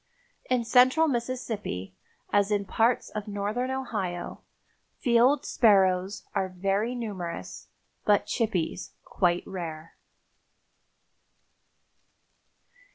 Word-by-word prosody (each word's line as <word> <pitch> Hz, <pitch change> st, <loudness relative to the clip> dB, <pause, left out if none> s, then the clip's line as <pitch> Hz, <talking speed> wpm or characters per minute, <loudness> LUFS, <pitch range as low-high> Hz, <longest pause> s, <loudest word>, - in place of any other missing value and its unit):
In 250 Hz, -2 st, +1 dB
Central 255 Hz, +7 st, +5 dB
Mississippi, 235 Hz, -, -3 dB, 0.4 s
as 200 Hz, 0 st, +3 dB
in 205 Hz, -1 st, 0 dB
parts 230 Hz, +5 st, +1 dB
of 210 Hz, 0 st, -5 dB
Northern 210 Hz, +5 st, -2 dB
Ohio, 210 Hz, -10 st, -4 dB, 0.6 s
field 245 Hz, +2 st, +3 dB
sparrows 190 Hz, -3 st, +3 dB
are 190 Hz, -, 0 dB
very 195 Hz, +6 st, -1 dB
numerous, 190 Hz, -8 st, -6 dB, 0.4 s
but 205 Hz, -1 st, +3 dB
chippies 190 Hz, -7 st, -2 dB
quite 175 Hz, -2 st, 0 dB
rare. 165 Hz, -4 st, -7 dB
205 Hz, 85 wpm, -27 LUFS, 185-240 Hz, 0.6 s, Central